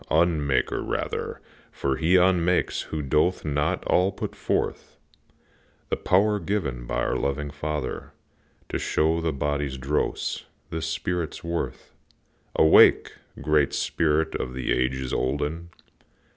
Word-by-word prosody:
unmaker 80 -4 +2
rather, - - -3 0.3
For 65 -1 -1
he 85 +5 +3
unmakes 90 -1 +3
who 80 -1 -4
doth 75 +7 +1
not 75 -1 0
all 90 +2 +3
put - - -5
forth - - -2 0.9
The - - +1
power 105 +3 +2
given 70 -14 -2
by - - -1
our - - 0
loving 70 +1 -2
Father 75 -2 -4 0.6
To - - -2
show 80 +2 +1
the 80 -1 0
body's 70 -1 -2
dross, 65 - -2 0.3
the 80 -1 -3
spirit's 85 +1 -3
worth. 85 0 -4 0.6
Awake! 80 - +6 0.3
great 75 -2 +2
spirit 80 0 +1
of 65 - -4
the 65 -2 -2
ages 65 +1 -1
olden! 75 +6 -2
75 Hz, 120 wpm, -25 LUFS, 70-85 Hz, 0.9 s, Awake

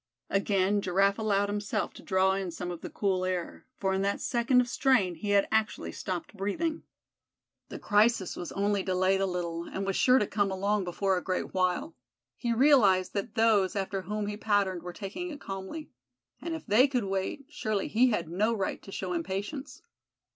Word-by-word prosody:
Again 195 0 +2
Giraffe 195 +2 +2
allowed 205 -2 +1
himself 205 0 -2
to - - -12
draw 190 0 +2
in 190 -1 -2
some 175 +1 -5
of 175 - -7
the - - -6
cool 190 -3 0
air; 185 +3 -3
for 190 -1 0
in 190 - 0
that 200 +1 0
second 240 +1 +2
of 250 - +2
strain 245 -8 +2
he 175 +5 -6
had 200 -1 +4
actually 220 -1 0
stopped 185 +1 -5
breathing. 310 - -2 0.9
The - - -6
crisis 210 -2 +2
was 175 - -6
only 200 0 +1
delayed 185 +1 +1
a 195 - +2
little, 170 -2 -3
and 195 +2 -4
was 195 -1 -1
sure 255 0 +5
to 210 - +2
come 205 -1 0
along 200 +1 0
before 190 +2 0
a - - -13
great 185 -1 -2
while. 185 -3 0 0.4
He 240 - -2
realized 225 -8 +4
that 200 +1 -3
those 215 -5 +3
after 195 0 -2
whom 210 +3 -3
he 205 0 -4
patterned 200 -4 +1
were 180 +1 -6
taking 210 - -6
it 295 -3 -8
calmly; 195 +11 -7 0.5
and 335 -1 -3
if 320 - -8
they 240 +5 +5
could 255 -4 -1
wait, 195 +8 -3
surely 215 -2 -2
he 250 +3 +4
had 175 -8 -1
no 210 +7 +1
right 195 -3 -2
to 195 - -12
show 185 -2 -3
impatience. 205 - -4
200 Hz, 190 wpm, -29 LUFS, 185-220 Hz, 0.9 s, sure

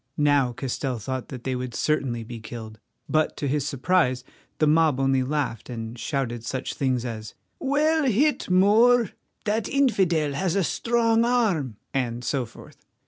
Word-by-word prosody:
Now 145 -4 +3
Castell 130 +1 -3
thought 130 +4 -4
that 125 -3 -8
they 130 -1 -1
would 125 -1 -5
certainly 130 -6 0
be 115 +1 -8
killed, 110 -1 -9 0.3
but 155 0 +1
to 145 - -2
his 145 +1 0
surprise 140 -3 +1 0.3
the 155 - +3
mob 155 -3 +3
only 135 -1 +2
laughed 130 -5 -2
and 115 -1 -5
shouted 120 -2 -3
such 130 +3 -3
things 130 -3 0
as 110 -3 -6 0.2
"Well 300 +3 +2
hit, 270 +4 +2
Moor!" 215 +5 +5 0.3
"That 215 0 0
infidel 185 - +2
has 165 +5 -1
a 195 - +2
strong 230 +4 +2
arm," 200 - +1 0.2
and 120 -3 -2
so 130 -1 -1
forth. 115 - -15
140 Hz, 155 wpm, -25 LUFS, 125-195 Hz, 0.3 s, Moor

